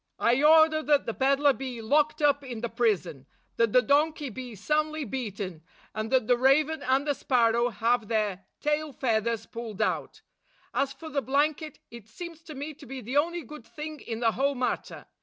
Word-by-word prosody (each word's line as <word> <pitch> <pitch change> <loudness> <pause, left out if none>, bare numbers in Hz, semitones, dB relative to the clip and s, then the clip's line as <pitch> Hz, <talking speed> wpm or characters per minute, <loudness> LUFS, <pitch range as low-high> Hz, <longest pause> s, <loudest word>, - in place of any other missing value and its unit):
I 240 +3 +2
order 315 +1 +6
that 295 -2 +2
the 230 - -2
peddler 275 +2 +3
be 255 -2 -6
locked 300 +6 +1
up 285 -1 +3
in 245 -4 -6
the 235 - -2
prison; 195 - -1 0.3
that 230 -2 +3
the 250 +2 +5
donkey 295 0 +1
be 250 0 -8
soundly 305 +7 -1
beaten; 200 -8 -5 0.3
and 215 0 -3
that 260 -3 +2
the 245 +1 +2
raven 295 +4 +3
and 270 +1 +1
the 290 - +1
sparrow 235 -3 +2
have 230 +1 0
their 210 -4 -1 0.2
tail 300 0 -1
feathers 230 -3 0
pulled 230 -4 -8
out. 215 - -2 0.5
As 275 -1 0
for 315 +4 -9
the 285 -2 -1
blanket, 295 +3 0
it 235 -3 -11
seems 335 +6 -9
to 310 - -9
me 290 +3 -5
to 285 -1 -14
be 265 +2 -6
the 250 +5 -2
only 340 +3 +1
good 300 +4 -11
thing 305 0 -7
in 230 0 -6
the 230 -1 +3
whole 275 +4 0
matter. 250 0 -3
265 Hz, 190 wpm, -27 LUFS, 230-300 Hz, 0.5 s, order